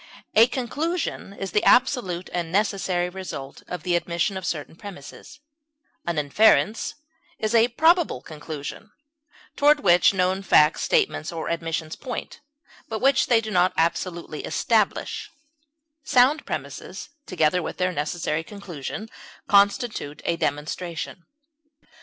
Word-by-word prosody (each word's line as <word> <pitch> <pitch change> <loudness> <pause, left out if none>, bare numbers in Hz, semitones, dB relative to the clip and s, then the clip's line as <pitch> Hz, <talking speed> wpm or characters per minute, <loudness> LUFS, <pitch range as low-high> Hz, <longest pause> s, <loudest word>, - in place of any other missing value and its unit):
A 225 +2 +7
conclusion 285 - -3
is 195 -2 -5
the 210 - +2
absolute 240 -9 +3
and 170 -2 -2
necessary 190 -3 +1
result 180 -7 -7
of 180 -3 -6
the 175 -1 +1
admission 175 +3 -1
of 190 -1 -4
certain 155 -1 -4
premises; 200 - -11 0.7
an 170 -2 -1
inference 210 +8 +3 0.4
is 215 +1 -2
a 230 0 +5
probable 320 - +3
conclusion 155 +6 -8 0.7
toward 290 +1 +4
which 175 -1 +5
known 190 0 0
facts, 155 -4 +4
statements, 410 - +1
or 165 -1 -4
admissions 165 -1 -3
point, 250 - -6 0.5
but 220 - -2
which 270 +5 +3
they 235 -2 +5
do 220 -1 -5
not 180 -1 +3
absolutely 170 -1 -1
establish; 215 +7 0 0.7
sound 270 +5 +3
premises, - - -6 0.2
together 180 0 +2
with - - -5
their 185 0 +1
necessary 160 0 -2
conclusion, 200 +1 -7 0.4
constitute 200 - +2
a 170 - +1
demonstration. 165 +3 -4
185 Hz, 125 wpm, -24 LUFS, 165-225 Hz, 0.7 s, A